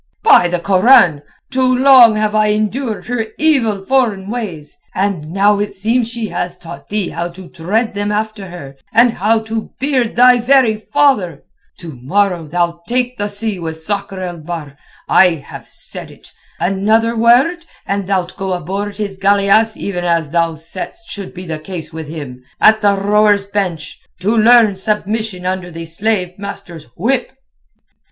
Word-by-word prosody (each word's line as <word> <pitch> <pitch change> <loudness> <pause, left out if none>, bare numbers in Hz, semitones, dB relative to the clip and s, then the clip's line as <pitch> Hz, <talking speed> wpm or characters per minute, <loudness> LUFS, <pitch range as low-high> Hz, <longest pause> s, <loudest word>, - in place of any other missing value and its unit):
By 180 - +6
the 175 0 -2
Koran! 185 - +4 0.3
too 255 0 +2
long 255 -4 +7
have 215 0 0
I 215 0 +3
endured 215 +2 -2
her 235 -2 -2
evil 230 -11 +1
foreign 220 -7 0
ways, 185 -11 -5 0.2
and 190 -6 -2
now 200 +3 +2
it 205 -1 -3
seems 225 +4 0
she 235 -3 -4
has 175 0 -4
taught 170 0 -11
thee 205 -3 -1
how 170 +1 -3
to 175 +1 -12
tread 215 +8 -2
them 205 0 -2
after 215 -1 -3
her 140 -6 -10
and 235 +2 +5
how 220 +3 +1
to 220 0 -5
beard 260 -4 0
thy 250 +1 +6
very 245 -2 +3
father! 215 - +1 0.4
To 165 -3 -8
morrow 180 +2 0
thou'lt 170 +1 -2
take 250 0 -1
the 205 - -1
sea 205 -1 -3
with 160 -1 -5
Sakr 200 +1 -3
el 175 -2 -5
Bahr, 155 -3 -7 0.3
I 180 -3 +5
have 145 - -11
said - - -8
it. - - -16 0.3
Another 215 +5 +1
word 260 +10 +3 0.2
and 200 -1 -2
thou'lt 185 -2 -1
go 190 -1 -2
aboard 195 +4 -4
his 200 -3 -4
galeasse 200 +2 +3
even 180 -3 -4
as 170 -4 0
thou 165 -1 +1
saidst 185 - -8
should 200 -2 -6
be 185 0 -9
the 160 -2 -5
case 165 0 -8
with 160 -1 -7
him—at 145 +8 0
the 205 -1 +3
rowers' 205 0 +2
bench, 185 -6 -3 0.2
to 210 +5 +1
learn 225 -2 +5
submission 210 -1 -2
under 185 -1 -3
the 165 -1 -8
slave 180 +1 -2
master's 200 -5 -8
whip." 245 +9 -1
200 Hz, 160 wpm, -16 LUFS, 175-225 Hz, 0.4 s, long